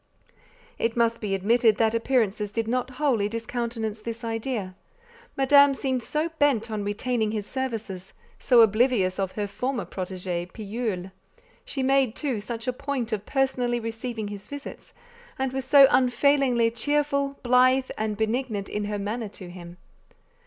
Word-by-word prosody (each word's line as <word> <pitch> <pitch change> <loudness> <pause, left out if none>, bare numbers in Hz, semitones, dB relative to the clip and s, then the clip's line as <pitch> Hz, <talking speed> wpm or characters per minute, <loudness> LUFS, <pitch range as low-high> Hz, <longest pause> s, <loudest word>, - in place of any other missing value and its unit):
It 230 +1 -1
must 230 0 +2
be 200 -3 -1
admitted 220 +2 +3
that 225 -1 +2
appearances 225 -4 0
did 225 0 -2
not 250 +2 -1
wholly 245 -9 +1
discountenance 230 -1 -4
this 230 +1 -6
idea; 225 -4 -3 0.6
Madame 280 +1 +6
seemed 260 -2 -1
so 305 +7 -2
bent 240 -6 +2
on 210 -1 -2
retaining 220 +2 -1
his 210 -2 -3
services, 220 -7 -5 0.3
so 245 -3 +5
oblivious 215 -4 +3
of 190 -1 -1
her 210 - -2
former 250 +5 -3
protégé, 180 -1 -4
Pillule. 210 -4 -4 0.5
She 270 - -3
made, 265 -3 +2
too, 270 -7 -2
such 230 +3 -6
a 255 - +1
point 265 -3 -3
of 210 -2 -3
personally 255 -3 0
receiving 225 -1 -5
his 205 -1 -8
visits, 285 -1 -9 0.4
and 265 -1 -2
was 265 -1 -3
so 275 +1 +8
unfailingly 255 -2 +3
cheerful, 280 +3 0
blithe, 255 +1 +4
and 215 -1 -2
benignant 220 -2 -1
in 210 0 -2
her 205 0 -3
manner 210 +2 -3
to 185 -3 -10
him. 175 -1 -11
230 Hz, 150 wpm, -25 LUFS, 210-260 Hz, 0.6 s, so